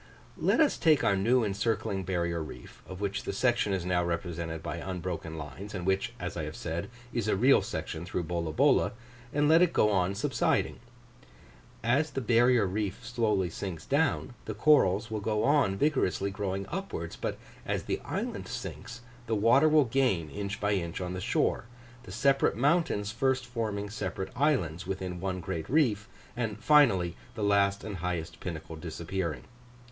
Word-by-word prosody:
Let - - +2
us 310 -3 +4
take 155 -5 +4
our 100 - +3
new 115 +6 +3
encircling 105 -1 -1
barrier 85 -2 -1
reef, 60 -6 -10
of 95 +1 -8
which 100 -1 -1
the - - -3
section 110 0 +1
is 95 -3 -1
now 90 -1 +1
represented 85 -1 -3
by 85 0 -4
unbroken 85 -2 -4
lines, 80 +8 -7
and 90 -2 -4
which, 95 +6 0
as 90 0 -4
I 80 - -3
have 75 - -6
said, 85 +4 -4 0.2
is 115 -3 -1
a 105 - +2
real 130 +8 +5
section 80 - -5
through 90 0 -3
Bolabola, 85 -2 +2 0.4
and 145 0 +2
let 160 +2 +6
it 180 -2 +4
go 105 - +4
on 95 -1 +1
subsiding. 100 - 0 1.0
As 140 +7 +2
the 135 - -3
barrier 120 -1 +4
reef 100 +1 -3
slowly 110 -7 0
sinks 85 -3 -5
down, 140 -3 +1
the 110 - -4
corals 105 -5 +4
will 110 - -1
go 105 +1 0
on 140 -9 +3
vigorously 100 -8 +1
growing 95 -1 -3
upwards; 170 - -4
but - - -3 0.3
as - - -2
the - - -2
island - - -4
sinks, - - -7 0.3
the 115 - +1
water 115 +9 +5
will 155 -2 +5
gain 115 - +1
inch 100 +1 -4
by 105 0 +1
inch 85 -4 -2
on 90 -1 -3
the 90 - -4
shore 110 - 0 0.4
the 95 - -9
separate 135 +2 +2
mountains 135 - +2
first 130 +2 0
forming 110 -4 -3
separate 95 -2 -4
islands 110 - +1
within 95 -1 -3
[picture] - - -9
one 95 -1 -2
great 85 -3 -4
reef 120 -7 +2 0.3
and 115 -3 -2
finally, 110 - +4 0.2
the 110 - -3
last 100 -1 +2
and 105 -3 -5
highest 85 -1 -4
pinnacle 80 -2 -6
disappearing. 85 +1 -4
100 Hz, 170 wpm, -29 LUFS, 90-120 Hz, 1.0 s, let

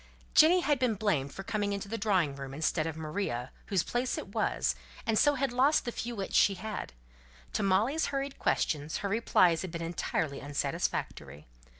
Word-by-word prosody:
Jenny 345 +4 +7
had 290 -5 +1
been 250 -4 +2
blamed 160 -10 0
for 195 - -7
coming 205 0 -1
into 200 0 -4
the 225 - -4
drawing 190 -10 +1
room 135 -1 -7
instead 155 +1 0
of 160 -1 -5
Maria, 150 -6 -3 0.2
whose 190 -6 +1
place 245 +1 -1
it - - -6
was, - - 0 0.3
and 225 - +1
so 290 +6 +4
had 270 -2 -1
lost 270 +5 +3
the 240 - -2
few 240 0 -4
wits 195 -2 -4
she 200 - +5
had. 215 +2 -5 0.6
To - - 0
Molly's 215 +11 +2
hurried 275 0 -3
questions 150 0 0
her - - 0
replies 185 -6 +3
had 185 - -4
been 165 0 -5
entirely 160 -3 -2
unsatisfactory. 140 - -3
195 Hz, 185 wpm, -30 LUFS, 155-240 Hz, 0.6 s, Jenny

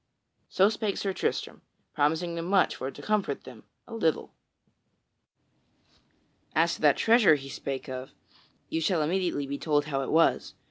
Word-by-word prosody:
So 190 - +4
spake 215 -2 -2
Sir 195 -1 -2
Tristram, - - -3 0.3
promising 160 +4 0
them 165 0 -4
much 190 +1 +2
for 130 - -4
to - - -11
comfort 215 -2 -1
them - - -13 0.2
a - - -10
little. 165 -9 -1 2.2
As 165 +2 +3
to - - -8
that 145 -3 +4
treasure 225 -8 +5
he 135 -1 -7
spake 135 0 -5
of, 130 0 -6 0.6
ye 160 - -2
shall 165 -1 +1
immediately 170 -3 -1
be 140 +1 -5
told 145 -2 +1
how 140 -2 -2
it 135 - -4
was. 165 +1 +2
160 Hz, 155 wpm, -28 LUFS, 145-190 Hz, 2.2 s, treasure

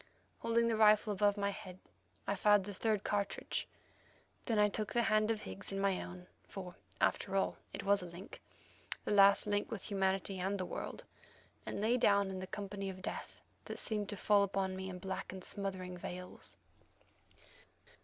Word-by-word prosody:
Holding 230 0 +2
the 230 - +2
rifle 215 0 +5
above 205 +1 +3
my 200 0 +1
head, 185 -2 -9 0.5
I - - 0
fired 205 0 +5
the 205 +1 -6
third 210 +1 0
cartridge. 205 -1 -1 0.8
Then 225 -4 +1
I 210 0 +6
took 210 +1 -3
the 240 -1 +3
hand 215 -1 +3
of 225 -2 0
Higgs 95 - -6
in 195 - -2
my 195 -1 +1
own, 180 0 -8 0.2
for, 185 -3 -7 0.3
after 195 - +1
all, 195 - +1
it - - -5
was 200 0 +5
a 180 - -6
link—the 175 +4 -10
last 200 -1 +7
link 205 0 0
with 215 -1 -5
humanity 195 0 0
and 195 +2 0
the 185 - -1
world—and - - -8
lay 230 +4 +3
down 200 -4 +4
in 190 - -4
the 185 - -5
company 200 -1 -4
of 185 0 -8
death - - -5 0.2
that - - -5
seemed 210 -2 -1
to 205 - -4
fall 205 +1 +4
upon 195 -1 0
me 190 0 -4
in 185 - -5
black 190 +1 -4
and 190 -1 -8
smothering 190 -3 -4
veils. 180 +1 -5
200 Hz, 175 wpm, -35 LUFS, 190-210 Hz, 0.8 s, last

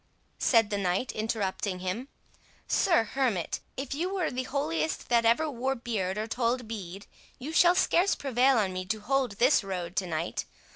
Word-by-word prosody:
said 225 -4 +3
the 205 - 0
knight 190 +6 0
interrupting 205 -3 -2
him,—"Sir 230 - -2
Hermit, 225 -6 -1 0.2
if 270 0 -4
you 345 +6 -2
were 375 -5 -1
the 255 0 -3
holiest 160 - -2
that 235 -1 +3
ever 235 +8 +3
wore 265 -1 -1
beard 210 -6 -2
or 215 - -1
told 240 +1 -1
bead, 195 -3 -7 0.3
you 295 +6 -6
shall 350 +1 +6
scarce 365 +1 +3
prevail 265 -1 +2
on 195 -4 +1
me 185 0 -3
to 215 +4 -2
hold 260 +1 0
this 245 +4 +3
road 180 -2 -4
to 190 - 0
night. 165 0 -3
230 Hz, 165 wpm, -28 LUFS, 190-265 Hz, 0.3 s, shall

